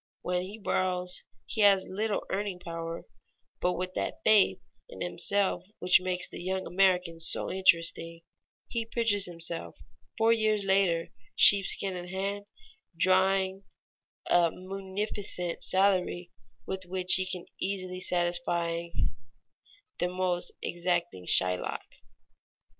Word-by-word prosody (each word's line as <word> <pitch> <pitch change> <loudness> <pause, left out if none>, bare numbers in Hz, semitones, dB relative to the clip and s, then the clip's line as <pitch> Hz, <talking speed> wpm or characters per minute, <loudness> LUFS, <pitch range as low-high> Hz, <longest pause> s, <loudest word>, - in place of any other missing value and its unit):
When 180 0 -1
he 195 +4 -8
borrows 180 -3 -1 0.2
he 220 - -3
has 195 -2 +5
little 210 +2 -2
earning 200 -1 -2
power, 165 -1 -6 0.6
but 180 - +1
with 185 +1 -4
that - - -3
faith 215 -2 +4 0.3
in - - -11
himself 195 -3 0
which 180 0 +4
makes 180 -1 -2
the - - -9
young 190 +1 -2
American 180 -3 +1
so 165 - +1
interesting, 170 -2 +2 0.4
he 230 -1 -2
pictures 225 -4 +3
himself 170 -1 -4 0.4
four 225 +1 +4
years 215 -2 +1
later, 190 -4 +2 0.3
sheepskin 195 -1 +5
in 175 0 -6
hand, 200 +2 -4 0.5
drawing 190 +1 +2 0.6
a 175 -1 +4
munificent 190 -1 -4
salary 185 -2 +1 0.3
with 190 -1 -5
which 185 0 0
he 185 0 +3
can 180 -2 -4
easily 185 -1 -3
satisfy 175 -1 0 1.1
the 175 - +1
most 180 -1 -1
exacting 175 - -2
Shylock. 90 -1 +1
185 Hz, 115 wpm, -29 LUFS, 175-195 Hz, 1.1 s, has